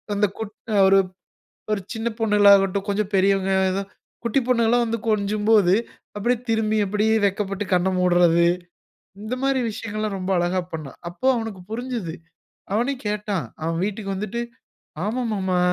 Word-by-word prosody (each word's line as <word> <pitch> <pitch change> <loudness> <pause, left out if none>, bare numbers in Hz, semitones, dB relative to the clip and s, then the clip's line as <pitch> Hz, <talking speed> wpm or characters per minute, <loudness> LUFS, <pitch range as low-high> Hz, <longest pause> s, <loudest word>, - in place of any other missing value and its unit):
அந்த 205 +1 +3
கொட் 215 -1 -6 0.3
ஒரு 195 0 +6 0.7
ஒரு 200 - -1
சின்ன 225 +1 -3
பொண்ணுகளாகட்டும், 200 -2 +4
கொஞ்சம் 205 0 -1
பெரியவங்க 195 0 +2 0.3
ஆ. - - -4 0.4
குட்டி 235 +3 +2
பொண்ணுகலா 235 -1 +3
வந்து 230 0 -1
கொஞ்சும்போது 210 -2 +3 0.4
அப்டியே 240 +4 +1
திரும்பி 220 -1 +1
அப்டியே 210 +3 +1
வெட்கப்பட்டு 195 0 -1
கண்ண 180 +1 +3
மூட்றது. 175 -2 +4 0.8
இந்த 215 +4 -3
மாரி 270 -1 +2
விஷயங்கள்லாம் 215 -1 -4
ரொம்ப 185 +1 -4
அழகா 175 +1 +1
பண்னான். 155 -5 -7
அப்போ 250 +9 -5
அவனுக்கு 225 -5 -5
புரிஞ்சுது. 230 -7 -4 0.6
அவனே 245 +6 +1
கேட்டான், 210 -3 -2 0.2
அவன் 165 +1 -1
வீட்டுக்கு 200 -1 -4
வந்துட்டு. 210 +4 -3 0.6
ஆமா 245 +4 -1
மாமா 190 -3 0
205 Hz, 135 wpm, -23 LUFS, 190-220 Hz, 0.8 s, ஒரு